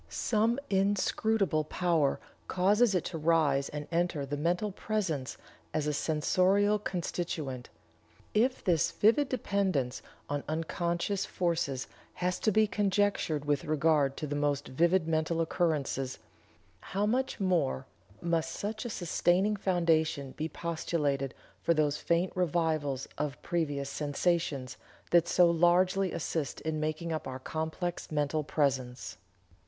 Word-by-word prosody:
Some 225 +2 +1
inscrutable 195 -2 +2
power 160 -3 +1 0.3
causes 205 +4 +3
it 180 - 0
to 165 - -4
rise 150 -4 +2
and 150 0 -6
enter 170 -4 0
the 140 +2 -3
mental 175 +7 0
presence 185 -10 -2 0.4
as 155 - 0
a 150 - 0
sensorial 185 +8 +2
constituent. 165 -9 -4 0.6
If 250 +5 +2
this 170 -4 +2
vivid 235 +7 +3
dependence 190 - 0 0.3
on 145 0 -2
unconscious 170 +4 -1
forces 165 -7 -1 0.3
has 180 0 -1
to 215 - +2
be 215 +2 +4
conjectured 200 -7 0
with 145 -2 0
regard 150 -2 +2
to - - -3
the 145 0 -3
most 145 0 0
vivid 170 +5 +2
mental 160 +1 0
occurrences, 150 -6 0 0.6
how 200 +2 -2
much 255 +4 0
more 175 - +1 0.4
must 165 -1 0
such 215 +3 -4
a - - -2
sustaining 185 +1 +1
foundation 160 -7 +1
be 155 +3 -4
postulated 150 -6 -2 0.3
for 170 - +2
those 150 -1 +2
faint 170 +2 0
revivals 160 -6 0
of 150 -2 -2
previous 145 -5 -1
sensations 145 -3 -1 0.3
that 170 -1 +5
so 175 -1 +5
largely 180 +3 +3
assist 160 -3 -3
in 160 -1 -2
making 155 +2 -2
up 155 - -4
our 130 -1 -5
complex 160 +6 -4
mental 150 +1 0
presence!" 130 -4 -1
165 Hz, 125 wpm, -30 LUFS, 145-185 Hz, 0.6 s, that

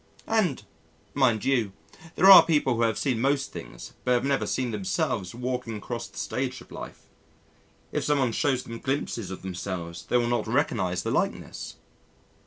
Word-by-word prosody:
And, 205 - +1 0.5
mind 125 -6 +2
you, 120 -8 +1 0.4
there - - +2
are 190 - +12
people 150 -6 +2
who 115 - -1
have 115 -2 +2
seen 125 -5 0
most 135 +1 +1
things - - -9
but 125 - +2
have 120 +1 +1
never 140 -1 +1
seen 125 -2 -1
themselves 95 -1 -2
walking 125 -2 -3
across 115 +2 -5
the - - -17
stage 130 0 -3
of - - -16
life. - - -9 0.9
If - - -1
someone 140 -5 +2
shows 130 +2 0
them 115 0 -8
glimpses 125 -7 -2
of 95 - -8
themselves 90 -2 -5
they 125 - +4
will 120 - +2
not 120 -2 0
recognise 110 - 0
the - - -2
likeness. - - -2
120 Hz, 170 wpm, -26 LUFS, 110-135 Hz, 0.9 s, are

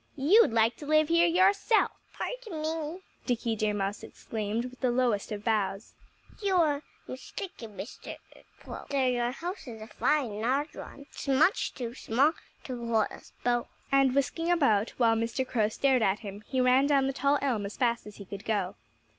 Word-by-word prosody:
You'd 320 - +5
like 225 +1 +2
to 290 - -9
live 310 0 +4
here 335 +1 +5
yourself." 390 +5 +3 0.2
"Pardon 450 -11 -5
me!" 320 +2 -3 0.3
Dickie 235 -2 0
Deer 210 -1 0
Mouse 200 0 -2
exclaimed 220 +1 -4
with 255 0 -10
the 255 - +1
lowest 240 -5 +1
of 210 -1 -5
bows. 210 -2 -1 0.5
"You 395 -2 +1
are 300 -5 +3 0.3
mistaken, 255 - -8
Mr. 220 - -7 0.5
Crow. - - -9
Though 275 -2 +1
your 245 -1 +1
house 345 +6 -6
is 225 -2 -8
a 215 - -8
fine, 225 -1 0
large 275 +6 0
one, 280 - -9
it's 280 - -10
much 295 +8 +2
too 240 -3 -5
small 265 +5 +2 0.3
to 245 -3 -6
hold 220 -2 +1
us - - -13
both." 240 -1 +1 0.2
And 270 -1 +4
whisking 330 +5 0
about, 225 -11 +3
while 230 -2 +4
Mr. 230 +3 -1
Crow 215 -4 +1
stared 260 +2 +2
at 200 0 +1
him, 205 -1 -8
he 260 - -1
ran 255 +2 +4
down 280 -2 +3
the 270 - -1
tall 280 +2 +2
elm 230 -8 -1
as 200 - -10
fast 235 -3 0
as 210 - -10
he 200 - -10
could 200 +2 -8
go. 200 -4 -1
255 Hz, 185 wpm, -29 LUFS, 220-295 Hz, 0.5 s, You'd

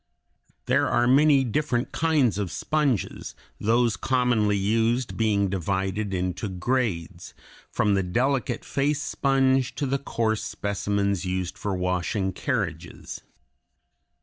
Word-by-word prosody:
There - - +2
are 120 - +2
many 140 +2 +5
different 125 0 -1
kinds 150 -10 +2
of 100 -3 -2
sponges, 150 -8 -1 0.2
those 115 +1 +2
commonly 120 -4 +1
used 115 +5 0
being 105 -3 +2
divided 95 +2 -2
into 90 +2 -2
grades, 95 -2 -2 0.3
from 105 - +1
the 95 - +2
delicate 120 +6 -1
face 145 +1 0
sponge 135 -2 +1
to 145 - -2
the 135 +1 0
coarse 110 -5 -1
specimens 100 -1 -1
used 90 -1 -2
for 100 -2 -3
washing 90 +1 -1
carriages. 95 - -4
110 Hz, 115 wpm, -25 LUFS, 95-130 Hz, 0.3 s, many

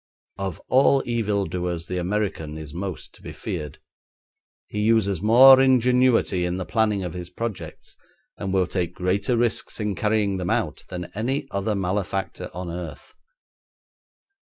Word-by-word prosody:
Of 95 -4 -4
all 135 +1 +4
evil 105 -4 0
doers 85 -1 -3
the 90 0 -3
American 90 -5 -2
is 75 -2 -9
most 90 -2 -6
to - - -18
be - - -8
feared; 75 -2 -6 0.9
he 105 - -5
uses 105 -4 +2
more 130 +5 +8
ingenuity 125 -6 +3
in 90 +1 -1
the 95 - -4
planning 105 -3 +1
of 90 -3 -4
his 90 -1 -7
projects, 110 +2 -6 0.4
and 95 - -4
will 95 -1 +2
take 90 -2 -3
greater 100 +6 0
risks 115 0 -1
in 105 -1 -1
carrying 105 0 0
them 90 -1 -3
out - - -1
than 90 -1 -6
any 125 +7 -1
other 100 +2 -1
malefactor 95 0 -2
on 90 -1 -6
earth. 85 -1 -8
100 Hz, 150 wpm, -24 LUFS, 90-110 Hz, 0.9 s, more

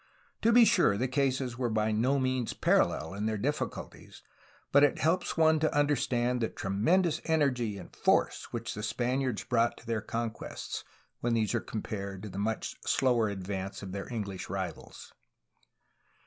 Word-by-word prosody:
To 230 - +4
be 235 0 +8
sure, 100 - +4
the 125 +4 0
cases 130 -2 0
were 125 -2 0
by 110 0 +1
no 125 +6 +2
means 130 -3 0
parallel 80 +4 +2
in 105 +2 -2
their 110 -1 -1
difficulties, 130 0 -4 0.5
but 140 +1 +6
it 145 - +4
helps 170 +3 0
one 160 -1 +5
to 155 0 +1
understand 125 -4 +1
the 115 - +1
tremendous 155 - +1
energy 125 -10 +1
and 90 - -11
force - - +2
which 115 -1 -4
the 105 - -5
Spaniards 125 +2 -1
brought 120 -1 +1
to - - -15
their 115 -2 -1
conquests, 115 +1 -4 0.4
when 120 -1 0
these 110 -1 +1
are 120 - +1
compared 100 -3 -5
to 105 - -6
the 95 - -6
much 110 +2 -2
slower 120 -4 +2
advance 95 0 -5
of 95 - -6
their 100 +5 -6
English 100 -5 -4
rivals. 95 -3 -6
115 Hz, 160 wpm, -30 LUFS, 105-135 Hz, 0.5 s, be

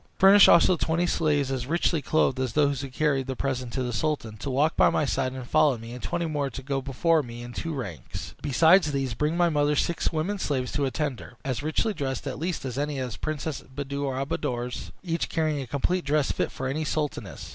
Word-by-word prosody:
Furnish 195 +1 +8
also 170 +2 +6
twenty 165 +2 +1
slaves, 145 -5 +1
as 130 -2 -3
richly 165 0 +1
clothed 140 -2 +1
as 130 -3 -1
those 140 -3 +2
who 135 - -5
carried 135 -1 0
the 130 - -3
present 130 -2 -2
to 130 - -1
the 120 -1 -3
sultan, 145 -6 -1
to 120 - -5
walk 145 +5 +2
by - - +5
my 150 - +1
side 130 -1 0
and 130 -2 -7
follow 140 -2 +3
me, 115 +1 -9
and 125 - -8
twenty 170 0 -2
more 145 -3 -1
to 135 +2 -8
go 135 0 -1
before 155 +5 +2
me 120 -2 -8
in 120 0 -8
two 165 - -4
ranks. 125 - -6
Besides 160 +3 +4
these, 135 -3 -1
bring 150 +7 0
my 175 -1 +4
mother 150 -1 +2
six 170 +3 0
women 175 +6 -1
slaves 130 -7 -1
to 140 0 0
attend 135 -1 -2
her, - - -12
as 130 -3 -2
richly 155 +8 0
dressed 135 -5 -3
at 135 -1 -4
least 170 -2 -3
as 130 0 -3
any 145 0 -2
of 130 -2 -3
the - - -8
Princess 155 -1 -3
Buddir 140 0 -4
al 135 - -1
Buddoor's, 125 -2 -3
each 170 -2 -2
carrying 155 -3 0
a 130 - -6
complete 175 +8 0
dress 145 0 +1
fit - - -1
for 130 - -5
any 150 +4 -1
sultaness. 150 -1 -3
140 Hz, 230 wpm, -26 LUFS, 130-155 Hz, -, Furnish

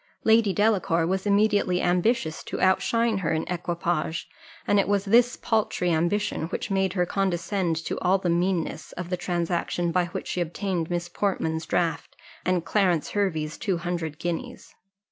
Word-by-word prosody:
Lady 220 -2 +4
Delacour 190 -5 +2
was 190 +3 -1
immediately 205 -3 +3
ambitious 175 -2 +1
to - - -5
outshine 225 +3 +2
her 175 - -1
in 160 0 0
equipage; 170 -2 -2 0.4
and 205 - +3
it 195 - +2
was 200 0 +1
this 235 +4 +4
paltry 215 -5 0
ambition 170 +1 0
that 195 - -4
made 190 -1 +1
her 180 -2 +1
condescend 185 -1 0
to 165 - -3
all 185 +2 +3
the 185 - -3
meanness 170 -2 -1
of 180 0 -6
the - - +2
transaction 175 -1 -1
by 180 0 +2
which 175 - -6
she 180 - -2
obtained 175 0 -2
Miss 175 0 -2
Portman's 165 -4 -2
draft, 170 -2 -1 0.3
and 180 -2 0
Clarence 180 -4 +1
Hervey's 160 -7 -1
two 190 -4 0
hundred 170 -3 -3
guineas. 170 0 -5
180 Hz, 160 wpm, -26 LUFS, 170-200 Hz, 0.4 s, Lady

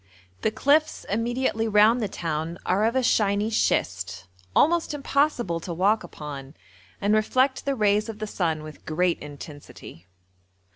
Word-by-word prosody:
The - - +2
cliffs 285 +8 +2
immediately 230 +1 0
round 215 +3 +5
the 215 - 0
town 165 -2 -3
are 195 +4 +2
of 230 +3 0
a 260 - +2
shiny 210 -2 +2
schist, 95 - 0 0.3
almost 330 -1 +3
impossible 275 - 0
to 170 0 -6
walk 200 +5 +2
upon, 145 -4 -8 0.4
and 205 +1 +1
reflect 255 +5 +2
the 275 -1 0
rays 210 -1 +2
of 220 - -6
the 215 - -4
sun 165 -7 -2
with 155 0 -11
great 175 +2 0
intensity. 145 - -11
210 Hz, 145 wpm, -25 LUFS, 160-235 Hz, 0.4 s, round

